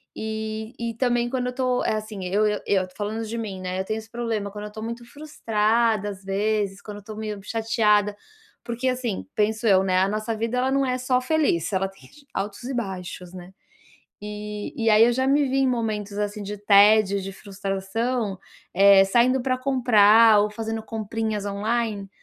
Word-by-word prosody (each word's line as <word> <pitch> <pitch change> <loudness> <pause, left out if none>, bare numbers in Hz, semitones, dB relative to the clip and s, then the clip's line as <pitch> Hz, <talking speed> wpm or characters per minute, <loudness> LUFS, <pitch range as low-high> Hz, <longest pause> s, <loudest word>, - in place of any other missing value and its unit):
E 220 +1 -5
e 235 -1 -3
também, 240 0 +1
quando 250 -1 -2
eu 250 - -4
tô, 255 -1 0
eh, - - +1
assim, 215 -3 -5
eu 200 +4 +1
eu 210 0 -1
eu 190 -2 +2
falando 215 +2 -3
de 225 +2 -5
mim, 200 -5 -5
né, 185 0 -3
eu 190 - -2
tenho 215 +2 -2
esse 220 0 -13
problema, 225 -4 -3
quando 210 +1 -7
eu 210 - -8
tô 215 - -8
muito 235 +2 -6
frustrada, 225 -6 0
às 195 -2 -8
vezes, 200 0 -1
quando 210 -1 -8
eu - - -8
estou 215 +1 -9
meio 215 -2 -4
chateada, 210 -2 +1 0.5
porque 245 +2 -2
assim, 250 -6 -3
penso 220 +1 0
eu, 190 -2 +5
né, 185 -1 +2
a 190 +1 +2
nossa 215 +2 -2
vida, 230 +3 -2
ela 255 +1 +1
não 275 0 +2
é 255 -1 0
só 255 0 +1
feliz, 255 - +1
ela 190 0 +1
tem 195 0 -17 0.2
altos 200 +3 -4
e 265 +2 -4
baixos, 185 -6 -5
né, 180 0 -11 0.7
e 210 0 -6
e 225 -1 +1
aí 215 +1 +6
eu 240 - +2
já 260 +2 0
me 285 +1 +3
vi 265 +1 -1
em 270 - +3
momentos, 215 -4 -2
assim, 210 0 -3
de 205 +1 -5
tédio, 205 0 +5
de 195 +1 -6
frustração, 195 +3 -3 0.4
eh, 195 +1 +7
saindo 245 +6 +3
pra 255 -1 0
comprar 230 -4 +5
ou 210 - 0
fazendo 225 +1 -4
comprinhas 220 -1 -3
online, 205 0 -2
215 Hz, 195 wpm, -24 LUFS, 200-235 Hz, 0.7 s, eh